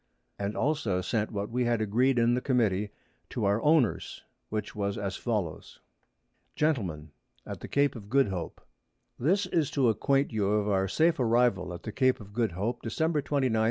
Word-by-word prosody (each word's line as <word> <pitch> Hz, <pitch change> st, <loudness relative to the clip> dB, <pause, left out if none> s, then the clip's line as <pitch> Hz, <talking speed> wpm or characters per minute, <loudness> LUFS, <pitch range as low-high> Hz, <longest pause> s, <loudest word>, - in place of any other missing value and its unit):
And 100 Hz, +1 st, -3 dB
also 130 Hz, -11 st, 0 dB
sent 105 Hz, +3 st, -1 dB
what 100 Hz, 0 st, -4 dB
we 125 Hz, +1 st, 0 dB
had 120 Hz, -1 st, +1 dB
agreed 120 Hz, +5 st, +2 dB
in 120 Hz, 0 st, +4 dB
the 125 Hz, -, 0 dB
Committee 105 Hz, -7 st, +1 dB, 0.4 s
to -, -, -2 dB
our 100 Hz, +3 st, +2 dB
Owners, 150 Hz, -7 st, +1 dB, 0.3 s
which 105 Hz, -1 st, -4 dB
was 100 Hz, -1 st, -2 dB
as 100 Hz, -2 st, -3 dB
follows. 105 Hz, -10 st, -3 dB, 0.8 s
Gentlemen, 95 Hz, -, -1 dB, 0.3 s
[Sidenote: -, -, -9 dB
At -, -, -17 dB
the -, -, -8 dB
Cape 140 Hz, -1 st, +1 dB
of 105 Hz, -3 st, -10 dB
Good 135 Hz, -1 st, +3 dB
Hope.] 90 Hz, -3 st, -5 dB, 0.6 s
This 185 Hz, +10 st, +2 dB
is 165 Hz, -5 st, 0 dB
to 135 Hz, -6 st, +2 dB
acquaint 135 Hz, +4 st, +1 dB
you 100 Hz, -2 st, +1 dB
of 105 Hz, -1 st, +1 dB
our 95 Hz, -1 st, +1 dB
safe 160 Hz, -, +2 dB
Arrival 115 Hz, -6 st, +2 dB
at 85 Hz, -, -8 dB
the 110 Hz, -, -5 dB
Cape 130 Hz, +2 st, +2 dB
of 100 Hz, -2 st, -12 dB
Good 115 Hz, -5 st, 0 dB
Hope, 110 Hz, +7 st, -2 dB
_December, 155 Hz, +5 st, 0 dB
29, 135 Hz, -5 st, 0 dB
1710. -, -, +2 dB
115 Hz, 190 wpm, -29 LUFS, 100-135 Hz, 0.8 s, in